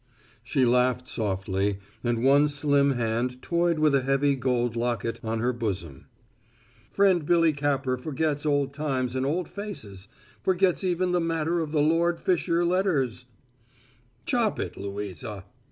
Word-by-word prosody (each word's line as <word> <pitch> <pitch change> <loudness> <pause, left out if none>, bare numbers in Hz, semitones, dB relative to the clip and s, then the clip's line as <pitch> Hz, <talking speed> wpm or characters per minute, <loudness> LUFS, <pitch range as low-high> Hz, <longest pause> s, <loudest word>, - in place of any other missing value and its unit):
She 130 +2 +1
laughed 125 +1 +2
softly, 95 -1 -1 0.3
and 120 -1 0
one 140 +2 +5
slim 145 -1 +2
hand 120 +1 -1
toyed 170 -1 +1
with 155 -1 +3
a 135 - +3
heavy 135 +2 +2
gold 120 -2 0
locket 115 -1 -2
on 110 0 -2
her 125 +1 +1
bosom. 95 - -4 0.8
"Friend 190 -4 +3
Billy 165 0 +3
Capper 140 -3 0
forgets 150 +2 -2
old 145 -2 +1
times 130 -4 -2
and 130 +1 0
old 170 +3 -1
faces 105 - -8 0.3
forgets 190 0 +2
even 180 0 0
the 180 - +2
matter 165 0 0
of 160 -2 -3
the 150 -2 +2
Lord 165 +2 +2
Fisher 175 -1 +1
letters 170 - 0 0.5
" 120 0 -34
"Chop 235 -4 0
it, - - -4
Louisa!" 100 +1 -6
135 Hz, 145 wpm, -26 LUFS, 120-165 Hz, 0.8 s, one